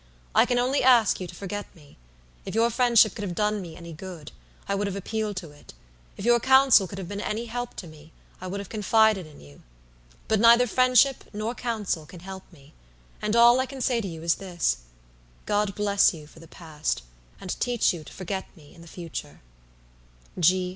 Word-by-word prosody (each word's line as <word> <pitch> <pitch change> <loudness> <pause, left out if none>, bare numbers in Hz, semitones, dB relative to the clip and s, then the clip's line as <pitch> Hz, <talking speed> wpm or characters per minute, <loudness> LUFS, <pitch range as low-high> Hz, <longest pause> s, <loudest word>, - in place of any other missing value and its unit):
I - - +5
can 245 - +1
only 255 +3 +1
ask 245 -4 +4
you 180 - -4
to - - -11
forget 205 +1 -6
me. 150 -4 -19 0.5
If - - -7
your 230 +1 +3
friendship 235 -3 +4
could 220 - -7
have 185 -4 -4
done 210 +2 0
me 170 -3 -9
any 170 -1 -10
good, 170 -2 -9 0.4
I - - -1
would 200 +1 -1
have 200 - -4
appealed 210 +1 -3
to 170 -5 -6
it. 145 - -16 0.4
If 195 - -6
your 240 0 +5
counsel 265 -5 +5
could 195 - -9
have 190 -3 -6
been 205 +2 -5
any 225 +3 -3
help 245 +1 -5
to - - -7
me, 155 0 -15 0.3
I 185 - -6
would 195 +2 -4
have 200 - -7
confided 215 -3 +2
in 150 - -15
you. 70 0 -16 0.7
But 220 - +2
neither 235 +2 +6
friendship 255 +2 +3
nor 215 +3 -3
counsel 215 -10 -3
can 175 +1 -12
help 190 +1 -10
me; 145 -3 -19 0.5
and 210 +1 -1
all 240 +2 +6
I 260 - 0
can 270 0 -9
say 245 -2 +1
to 200 - -5
you 165 -2 -8
is 170 0 +3
this, 180 -3 -1 0.7
God 205 -1 0
bless 200 -3 +3
you 155 -2 -11
for 155 - -17
the 165 - -14
past, 155 - -4 0.4
and - - -6
teach 245 -5 +1
you 165 -3 -8
to - - -13
forget 190 +1 -5
me 150 -3 -17
in 170 - -16
the 170 - -14
future. 170 -1 -8
200 Hz, 205 wpm, -25 LUFS, 170-235 Hz, 0.7 s, neither